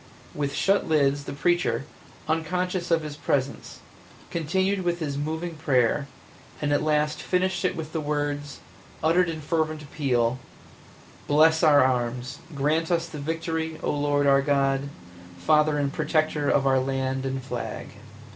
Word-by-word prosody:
With 140 -1 -2
shut 195 +1 +2
lids 145 -2 +2
the - - -5
preacher, 175 -1 +1 0.4
unconscious 175 +3 -1
of 165 -2 +2
his 150 -1 -6
presence, 140 -2 -2 0.5
continued 190 +4 0
with 175 -1 0
his 150 -5 -3
moving 160 +4 -3
prayer, 140 -2 +1 0.5
and 145 -1 0
at - - +2
last 150 0 +1
finished 185 +2 0
it 185 - +1
with 160 -1 -6
the 160 - -1
words, 145 -1 -3 0.4
uttered 175 +2 +3
in 160 -1 -5
fervent 155 0 -1
appeal, 130 -4 0 0.9
"Bless 160 +2 +5
our 150 -5 +6
arms, 125 -1 -1 0.2
grant 155 +4 +1
us 170 -1 +1
the 155 -2 -8
victory, 160 +1 -3
O - - +1
Lord 145 0 +1
our 140 0 +5
God, 140 -1 +1 0.5
Father 150 - +3
and 140 -1 -1
Protector 155 -1 0
of 140 - +2
our 135 -1 +4
land 135 0 -1
and 135 -1 -3
flag!" 125 -2 -5
150 Hz, 145 wpm, -25 LUFS, 140-160 Hz, 0.9 s, our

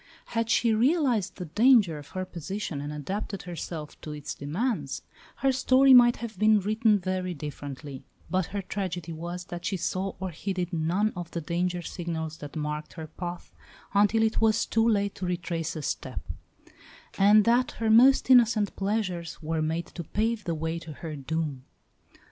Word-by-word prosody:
Had 230 -1 -1
she 230 0 +3
realised 250 - +2
the 180 - -6
danger 210 - +4
of 145 - -12
her 185 - -1
position, 180 -3 -5
and 145 +1 -5
adapted 190 +6 -4
herself 165 -3 -7
to 155 - -6
its 150 -1 -6
demands, 150 - -2 0.3
her 270 - +2
story 265 +1 +5
might 240 -1 +8
have 225 -5 -7
been 215 0 +5
written 215 +2 +2
very 185 -1 -2
differently; 145 -1 -7 0.3
but 185 0 0
her 200 -1 -4
tragedy 180 -4 -4
was 175 +2 -6
that 175 0 -7
she 190 - -1
saw 185 +2 -2
or 190 -1 -3
heeded 180 +1 -3
none 175 +7 +1
of 175 -2 -6
the 170 - -4
danger 175 +2 -2
signals 160 -3 -4
that 145 0 -9
marked 150 0 -4
her 160 -2 -7
path 175 +3 -7 0.4
until 210 +2 +4
it 220 0 +1
was 220 -1 +3
too 225 +1 +2
late 200 -2 +1
to 185 - -5
retrace 170 -2 -2
a 155 - -5
step; - - -3 1.0
and 205 +2 +6
that 240 +2 +3
her 225 -1 0
most 260 +4 +6
innocent 230 -5 +5
pleasures 195 -5 -2
were 160 +1 -1
made 160 +2 -1
to 170 - -8
pave 220 +5 -1
the 170 - -1
way 160 +1 -2
to 165 -2 -9
her 155 +1 -7
doom. 145 -1 -3
180 Hz, 170 wpm, -27 LUFS, 160-215 Hz, 1.0 s, might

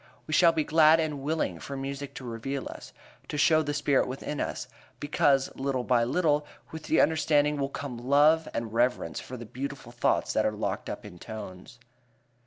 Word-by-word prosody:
We 155 - -5
shall 170 +1 +6
be 160 -2 0
glad 155 +1 +5
and 150 -3 -2
willing 145 - -1
for 140 +8 -6
music 140 +1 -5
to - - -8
reveal 125 +4 -4
us, - - -10 0.4
to 150 - -4
show 155 +1 +4
the 145 -1 -2
spirit 145 -2 +2
within 135 +3 -4
us, - - -4 0.3
because 140 -2 +2
little 135 -2 -1
by 120 -2 +2
little 150 +2 +2 0.3
with 160 -1 -8
the 160 - +2
understanding 150 -2 +3
will 140 -1 -1
come 140 -3 -6
love 150 +5 +4
and 115 -2 -4
reverence 120 -7 0
for 130 - -8
the 120 - -8
beautiful 130 +1 -6
thoughts 120 0 0
that - - +2
are - - +1
locked - - -3
up - - -6
in 90 - -11
tones. 105 +1 -9
140 Hz, 190 wpm, -28 LUFS, 125-150 Hz, 0.4 s, shall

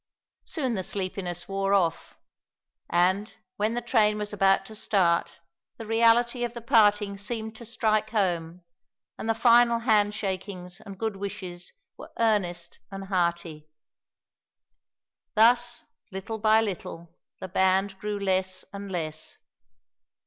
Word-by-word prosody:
Soon 265 -7 -2
the 195 - -1
sleepiness 185 -2 -4
wore 195 0 +1
off, 170 -4 -1 0.7
and, 185 +5 +1 0.2
when 215 +3 0
the 240 - -2
train 215 -3 +3
was 210 0 -4
about 195 -1 +3
to 220 - -10
start, 170 -5 +1 0.4
the 225 - -7
reality 235 +2 +3
of 240 0 -3
the 235 - -6
parting 210 -4 +3
seemed 220 +1 -4
to 235 - -10
strike 215 -2 0
home, 180 -5 -1 0.6
and 225 - -4
the 225 - +2
final 235 0 +5
handshakings 200 -4 -1
and 195 -1 -10
good 220 -1 -3
wishes 190 -3 -6 0.3
were - - -11
earnest 180 -7 0
and 195 0 -8
hearty. 170 -4 -1 1.7
Thus, 240 +2 +4 0.3
little 195 +4 -5
by 220 +1 +4
little, 170 -5 -5 0.3
the 190 - -6
band 190 +1 +1
grew 210 0 -3
less 185 -1 0
and 200 0 -7
less. 155 -3 -3
200 Hz, 125 wpm, -26 LUFS, 185-220 Hz, 1.7 s, final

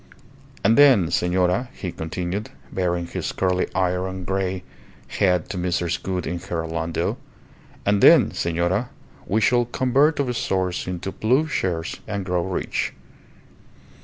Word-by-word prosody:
"And 115 +6 +4
then, 125 - +6
senora," 90 +7 +1
he 90 - -5
continued, 90 +6 -4 0.2
baring 90 -2 -1
his 85 - -4
curly 90 -1 0
iron 95 0 -1
grey 95 0 -2 0.4
head 90 -4 +1
to 95 - -4
Mrs. 90 -1 -1
Gould 90 -1 -3
in 85 - -3
her 85 -2 -4
landau 80 0 -2 0.7
"and 100 0 +2
then, - - +7
senora, 85 +8 0 0.4
we 110 - +2
shall 120 +3 +3
convert 130 +5 +2
our 130 -3 0
swords 95 -6 -1
into 90 +1 -4
plough 125 +9 +2
shares 90 - -2
and 100 -3 -3
grow 90 -2 0
rich. 95 0 -2
95 Hz, 135 wpm, -23 LUFS, 90-105 Hz, 0.7 s, then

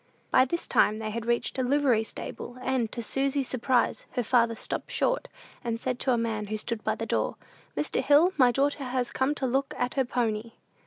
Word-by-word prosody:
By 255 - +6
this 340 +6 -3
time 210 +1 +3
they 220 -1 -4
had 230 +1 -4
reached 235 +2 0
a - - +2
livery 255 -4 +3
stable; 240 +2 -6
and, 255 -4 0
to 235 - -4
Susy's 270 +2 0
surprise, 255 0 0
her 245 - 0
father 230 0 +3
stopped - - -3
short, - - 0 0.4
and 230 -1 -2
said 250 0 -2
to 265 - +1
a 240 - +3
man 220 -2 -2
who 215 +1 -2
stood 225 +1 -4
by - - 0
the - - -4
door, - - 0 0.4
"Mr. - - 0
Hill, 315 +6 +5
my 255 -3 +5
daughter 280 +2 0
has 250 -1 -1
come 270 +3 +1
to 270 - -2
look 270 +2 0
at 245 - -1
her 265 -2 +1
pony." 230 -2 -1
245 Hz, 210 wpm, -28 LUFS, 230-270 Hz, 0.4 s, By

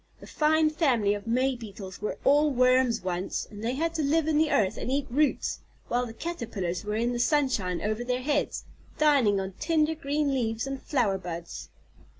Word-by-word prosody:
The - - -12
fine 310 0 +2
family 245 - +2
of 205 +1 -6
May 255 +3 +1
Beetles 200 -5 -9
were 210 - -3
all 295 +2 +5
worms 255 -3 +3
once, 180 0 -3
and 210 0 -9
they 240 +3 -1
had 330 +3 -1
to 325 - -1
live 310 +2 +1
in 305 -1 +2
the 315 -1 +3
earth 190 -3 +2
and - - -5
eat 280 0 0
roots, 295 +4 +1 0.3
while 245 +1 0
the - - -7
Caterpillars 225 - -4
were 210 0 -3
in 235 +2 0
the 240 - -2
sunshine 240 - +1
over 215 +3 -1
their 250 +1 -2
heads, 290 +1 -1 0.3
dining 275 -10 +4
on 190 0 -4
tender 315 0 +2
green 295 -2 -1
leaves 225 -3 -1
and 275 -1 -5
flower 220 -9 0
buds." 170 -2 -7
250 Hz, 190 wpm, -27 LUFS, 210-295 Hz, 0.3 s, all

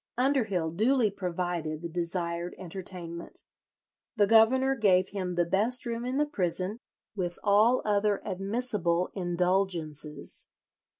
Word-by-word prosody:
Underhill 225 - +1
duly 225 +4 +2
provided 175 -4 -3
the - - -2
desired 170 0 -2
entertainment. 175 -2 -8 0.7
The 210 -3 +4
governor 235 +5 +5
gave 190 -6 +3
him 185 -3 -3
the 175 0 +2
best 215 +9 0
room 235 0 -3
in 255 +2 -2
the 300 - +3
prison, 190 - -1 0.4
with 175 -3 -3
all 215 +5 +4
other 205 -1 +2
admissible 195 -3 -1
indulgences. 175 -4 -1
190 Hz, 115 wpm, -29 LUFS, 175-220 Hz, 0.7 s, governor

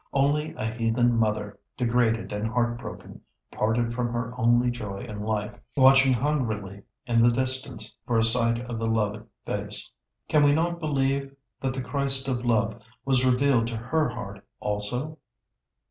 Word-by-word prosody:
Only 145 +3 +1
a - - -4
heathen 115 +1 +1
mother, 105 -2 -1 0.2
degraded 115 -2 +1
and 105 +2 -2
heart 120 +1 0
broken, 120 - -9 0.3
parted 115 +2 0
from 120 0 -2
her 120 0 -3
only 120 0 +3
joy 105 -5 -6
in 105 -4 -7
life, 105 -1 -2 0.2
watching 135 0 +6
hungrily 115 -8 -1 0.2
in 115 -2 +2
the 120 - +6
distance 130 -3 -2
for 120 - +1
a 110 - +3
sight 115 0 +2
of 120 -2 -5
the 115 - -1
loved 105 -1 -1 0.2
face. - - -5 0.4
Can 150 - +3
we 145 0 +5
not 170 +2 0
believe 140 -3 -1 0.3
that 130 -1 -2
the 130 - -3
Christ 135 0 +3
of 125 -2 -1
love 115 -1 0 0.2
was 130 -2 +2
revealed 125 -2 +3
to 115 -1 -4
her 145 +6 0
heart 100 -5 -8 0.2
also? 125 +10 -2
120 Hz, 160 wpm, -26 LUFS, 110-135 Hz, 0.4 s, watching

